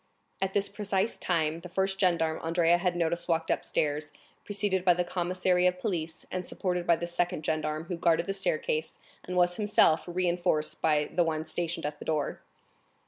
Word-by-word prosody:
At 195 Hz, 0 st, -1 dB
this 200 Hz, 0 st, +3 dB
precise 200 Hz, 0 st, -1 dB
time, 160 Hz, -2 st, 0 dB
the 180 Hz, -, -10 dB
first 190 Hz, +1 st, -1 dB
gendarme 170 Hz, -4 st, +1 dB
Andrea 170 Hz, +1 st, +3 dB
had 180 Hz, -1 st, 0 dB
noticed 170 Hz, 0 st, -1 dB
walked 165 Hz, -1 st, +1 dB
upstairs, 150 Hz, 0 st, -1 dB, 0.3 s
preceded 200 Hz, -2 st, 0 dB
by 180 Hz, -2 st, +5 dB
the 180 Hz, -, +1 dB
commissary 180 Hz, 0 st, +1 dB
of 180 Hz, 0 st, +1 dB
police, 170 Hz, -5 st, -3 dB
and 185 Hz, 0 st, -2 dB
supported 180 Hz, -2 st, -2 dB
by 170 Hz, -, +6 dB
the 170 Hz, -, -4 dB
second 175 Hz, -2 st, -1 dB
gendarme 155 Hz, 0 st, -1 dB
who 170 Hz, +1 st, -5 dB
guarded 170 Hz, 0 st, +2 dB
the 195 Hz, -, -2 dB
staircase 155 Hz, -4 st, -1 dB, 0.3 s
and 180 Hz, 0 st, -4 dB
was 175 Hz, 0 st, +3 dB
himself 205 Hz, -6 st, +3 dB
reinforced 175 Hz, -3 st, 0 dB
by 150 Hz, -2 st, +2 dB
the 175 Hz, -, +3 dB
one 160 Hz, -1 st, -2 dB
stationed 165 Hz, 0 st, -3 dB
at 150 Hz, 0 st, -4 dB
the -, -, -9 dB
door. 150 Hz, -3 st, -1 dB
175 Hz, 180 wpm, -29 LUFS, 160-180 Hz, 0.3 s, by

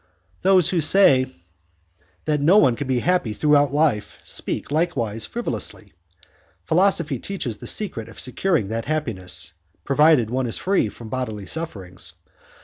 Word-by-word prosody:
"Those 185 Hz, -3 st, +4 dB
who 175 Hz, -3 st, +1 dB
say 145 Hz, -6 st, +5 dB, 1.0 s
that 150 Hz, -2 st, 0 dB
no 170 Hz, +8 st, +5 dB
one 130 Hz, -, +5 dB
can 140 Hz, -, -5 dB
be 130 Hz, -2 st, 0 dB
happy 180 Hz, -11 st, +1 dB
throughout 145 Hz, +1 st, +3 dB
life 140 Hz, -9 st, 0 dB
speak -, -, -4 dB
likewise 135 Hz, -10 st, -1 dB
frivolously. 240 Hz, 0 st, -4 dB, 0.7 s
Philosophy 170 Hz, -6 st, +1 dB
teaches 130 Hz, -, -4 dB
the -, -, -9 dB
secret 115 Hz, -, -2 dB
of 115 Hz, -, -12 dB
securing 130 Hz, -, 0 dB
that 115 Hz, +1 st, -3 dB
happiness, 95 Hz, -, -2 dB, 0.3 s
provided 140 Hz, -5 st, +4 dB
one 130 Hz, 0 st, -1 dB
is 115 Hz, -, -2 dB
free 190 Hz, -, +1 dB
from 115 Hz, +1 st, -11 dB
bodily 110 Hz, -5 st, -4 dB
sufferings. 95 Hz, -, -5 dB
135 Hz, 140 wpm, -22 LUFS, 115-165 Hz, 1.0 s, say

